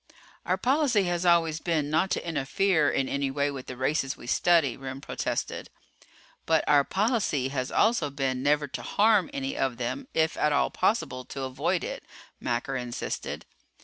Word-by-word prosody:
"Our - - +2
policy 260 -5 +2
has 175 0 -1
always 165 -2 +3
been 155 -3 -1
not 160 +5 +2
to 185 - -2
interfere 160 +1 +1
in 135 - 0
anyway 140 +1 -1
with 135 -2 -8
the 125 - -7
races 135 +1 0
we - - -12
study," 155 0 +3
Remm 135 0 -7
protested. 140 - -3 0.8
"But 160 -1 +3
our 145 -1 +5
policy 190 - 0
has 130 -2 -3
also 220 -9 +2
been 135 -2 -2
never 145 +1 +2
to - - -5
harm 210 0 +3
any 270 -1 -3
of 130 -3 -1
them, 125 - -4
if 160 0 +1
at 150 - +2
all 145 - +2
possible 185 - 0
to 135 0 -6
avoid 130 -1 -1
it," - - -5 0.4
Macker 120 +3 -2
insisted. 125 -2 -4
150 Hz, 165 wpm, -27 LUFS, 135-180 Hz, 0.8 s, our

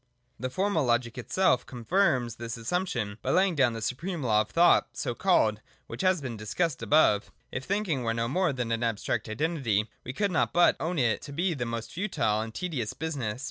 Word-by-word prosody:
The 130 - -2
Formal 185 +2 0
Logic 120 -1 +1
itself 130 +1 +1
confirms 125 - +1
this 115 -1 -5
assumption 115 - -2
by 130 - -3
laying 185 +5 +3
down 130 -6 +3
the 115 -1 -5
supreme 165 - -3
law 110 -3 +3
of 110 - -5
thought 170 +7 +3
(so - - -2
called) - - +2 0.2
which - - -6
has 185 -3 +2
been 125 -4 -5
discussed 130 +9 -2
above. 130 -8 +3 0.2
If 130 +1 -4
thinking 195 -9 -1
were 115 -1 0
no 115 0 0
more 180 +7 +1
than 125 -3 -3
an 115 0 0
abstract 115 0 -1
Identity, 115 -5 0 0.2
we 130 - -5
could 200 +7 0
not - - +1
but 175 - +5
own 170 +2 -2
it 115 -6 +1
to 145 - -9
be 175 +6 0
a 135 -7 -2
most 115 -1 -4
futile 155 - 0
and 110 0 -5
tedious 135 - -3
business. 135 -8 -3
130 Hz, 200 wpm, -28 LUFS, 115-175 Hz, 0.2 s, but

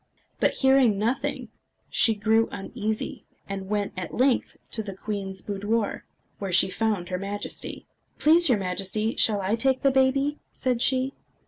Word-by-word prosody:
But - - +2
hearing 265 -6 +4
nothing, 230 +6 -2 0.4
she 225 - +4
grew 220 +2 +2
uneasy, 215 +2 -4 0.2
and 195 -1 -5
went 205 -1 -1
at 185 -2 -5
length 255 0 +1
to 220 - +3
the 200 -3 -7
queen's 195 -1 -5
boudoir, 205 +2 -2 0.3
where 195 -2 -3
she 185 +1 +4
found 210 -6 -1
her 180 -1 -2
Majesty. 200 +1 -5 0.3
"Please, 325 +1 +5
your 240 - +4
Majesty, 195 +4 -2
shall 210 -3 +2
I 190 +3 -1
take 260 +3 +1
the 275 - +5
baby?" 270 +2 +2
said 250 -2 -1
she. 260 +1 +2
215 Hz, 150 wpm, -26 LUFS, 195-255 Hz, 0.4 s, Please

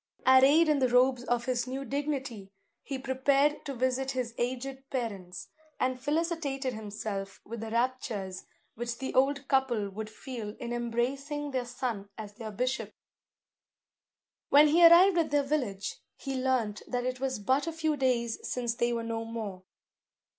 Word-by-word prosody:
Arrayed 270 +5 +7
in 300 -2 +3
the 255 -1 +3
robes 250 0 +4
of 240 -1 0
his 250 -1 -1
new 265 +2 -4
dignity, 270 -7 -3 0.3
he 275 - -4
prepared 275 +3 +2
to 275 - -5
visit 260 +2 0
his 255 -3 -2
aged 265 +2 -3
parents, 200 -9 -4 0.3
and 255 0 0
felicitated 290 -4 -1
himself 205 -2 -5
with 230 +2 -6
the 225 - -5
raptures 225 -6 -2 0.3
which 235 +1 -4
the 265 - -4
old 275 +1 +2
couple 240 -7 +1
would 215 +2 -6
feel 220 -2 -7
in 240 0 -4
embracing 270 +5 -2
their 255 -2 -1
son 235 -5 -4
as 210 -2 -7
their 220 0 -7
bishop. 250 +5 -2 1.5
When 295 +1 +7
he 340 +3 +5
arrived 345 +2 +8
at 330 - +1
their 290 0 +2
village, 255 -9 -2 0.2
he 275 - -5
learnt 255 -5 0
that 245 -1 -2
it 255 0 -2
was 265 -2 -1
but 260 +9 +1
a - - 0
few 315 -1 0
days 245 -4 0
since 240 -2 -2
they 240 0 0
were 230 -1 -1
no 230 0 -3
more. 220 -5 -5
255 Hz, 160 wpm, -30 LUFS, 230-275 Hz, 1.5 s, arrived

